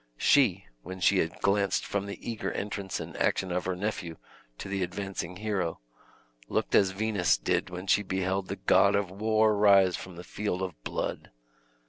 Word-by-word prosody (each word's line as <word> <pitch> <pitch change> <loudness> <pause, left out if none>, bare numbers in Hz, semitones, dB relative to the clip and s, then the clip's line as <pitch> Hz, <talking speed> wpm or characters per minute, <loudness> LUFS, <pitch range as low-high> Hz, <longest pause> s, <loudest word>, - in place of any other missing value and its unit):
She, - - +3 0.2
when 95 +6 -8
she 95 +1 +4
had 80 - -2
glanced 100 0 +1
from 100 0 -2
the 100 - -6
eager 115 -2 -3
entrance 100 -2 -4
and - - -7
action 95 -1 0
of 90 0 -1
her 95 0 -1
nephew 90 -4 -4 0.4
to - - -7
the 100 0 -2
advancing 95 -1 -4
hero, 95 -4 -2 0.7
looked - - -1
as 100 - +5
Venus 95 - +1
did - - -1
when 90 +1 -7
she 100 - +3
beheld 95 0 -2
the - - -3
god 100 0 +4
of 100 -2 0
war 110 +2 +2
rise 100 -3 +5
from 90 -2 -9
a 90 - -8
field 95 -2 -3
of 95 -2 -3
blood. - - -4
95 Hz, 175 wpm, -28 LUFS, 90-100 Hz, 0.7 s, as